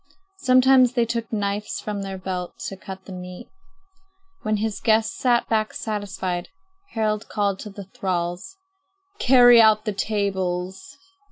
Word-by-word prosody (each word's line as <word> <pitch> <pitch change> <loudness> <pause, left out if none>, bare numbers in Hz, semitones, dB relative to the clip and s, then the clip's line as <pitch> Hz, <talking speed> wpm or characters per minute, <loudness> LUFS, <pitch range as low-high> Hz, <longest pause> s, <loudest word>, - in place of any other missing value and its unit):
Sometimes 255 -2 +5
they 240 -2 +2
took 230 0 -3
knives 205 -1 -2
from 210 -1 -4
their 195 -1 -5
belts 185 -1 -5
to 195 - -7
cut 190 0 -10
the - - -10
meat. 180 +3 -8 1.0
When 215 0 0
the 215 0 -2
guests 220 - +2
sat 245 -9 +1
back 215 -1 0
satisfied, 190 -4 -4 0.4
Harald 215 -1 -1
called 200 -2 -1
to 210 - -7
the 200 -1 -9
thralls: 180 - -4 0.6
"Carry 245 -2 +7
out 215 0 +4
the 210 - -1
tables." 195 +3 -3
210 Hz, 140 wpm, -23 LUFS, 190-230 Hz, 1.0 s, Carry